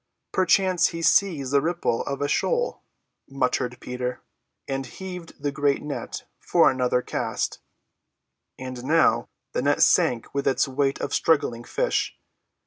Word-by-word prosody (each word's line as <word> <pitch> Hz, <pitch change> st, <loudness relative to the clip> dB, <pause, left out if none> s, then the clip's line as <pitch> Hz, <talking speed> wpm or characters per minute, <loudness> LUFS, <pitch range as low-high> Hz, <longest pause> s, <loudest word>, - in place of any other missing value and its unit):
"Perchance 185 Hz, 0 st, +3 dB
he 165 Hz, 0 st, -5 dB
sees 160 Hz, -9 st, +3 dB
the 140 Hz, -1 st, +4 dB
ripple 170 Hz, -7 st, 0 dB
of 140 Hz, 0 st, -2 dB
a -, -, +1 dB
shoal," 485 Hz, -, 0 dB, 0.5 s
muttered 125 Hz, -2 st, -1 dB
Peter, 125 Hz, 0 st, -4 dB, 0.5 s
and 135 Hz, 0 st, -2 dB
heaved 180 Hz, -3 st, -9 dB
the 145 Hz, 0 st, -1 dB
great 140 Hz, 0 st, +1 dB
net 150 Hz, -1 st, -5 dB, 0.2 s
for -, -, +4 dB
another 125 Hz, -1 st, +1 dB
cast. -, -, -2 dB, 1.0 s
And 130 Hz, -1 st, -7 dB
now 130 Hz, -6 st, +3 dB, 0.2 s
the -, -, -1 dB
net -, -, +3 dB
sank 115 Hz, -2 st, +2 dB
with 140 Hz, 0 st, -1 dB
its 135 Hz, -, +2 dB
weight 135 Hz, +1 st, 0 dB
of -, -, -3 dB
struggling 125 Hz, -7 st, +1 dB
fish. -, -, -1 dB
140 Hz, 135 wpm, -25 LUFS, 125-165 Hz, 1.0 s, the